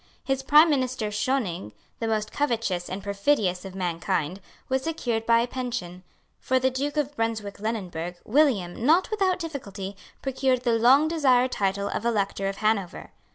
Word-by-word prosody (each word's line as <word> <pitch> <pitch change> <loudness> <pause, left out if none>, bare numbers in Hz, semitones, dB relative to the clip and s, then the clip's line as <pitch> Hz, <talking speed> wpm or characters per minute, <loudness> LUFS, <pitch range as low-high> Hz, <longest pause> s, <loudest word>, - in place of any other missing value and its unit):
His 270 0 -1
prime 300 +4 +6
minister 255 -5 0
Schoening, 210 - -1 0.3
the 230 - -2
most 215 -1 -1
covetous 230 -10 -1
and 190 +1 -5
perfidious 200 -2 0
of 190 -1 -8
mankind, 175 -1 -2 0.3
was 265 0 0
secured 245 -8 -2
by 230 0 +5
a 235 - -1
pension. 240 -9 -5 0.4
For 260 - +1
the 260 0 +2
Duke 285 +3 -3
of 290 -1 -1
Brunswick 220 -4 -2
Lunenburg, 180 -6 -4
William, 225 - +2
not 335 - +4
without 385 -4 +1
difficulty, 205 - -6 0.3
procured 260 -2 0
the 240 -2 +2
long 265 +6 +6
desired 260 -6 +3
title 200 -1 0
of - - -3
Elector 200 -4 0
of 195 - -5
Hanover. 215 -4 -1
230 Hz, 155 wpm, -26 LUFS, 195-265 Hz, 0.4 s, prime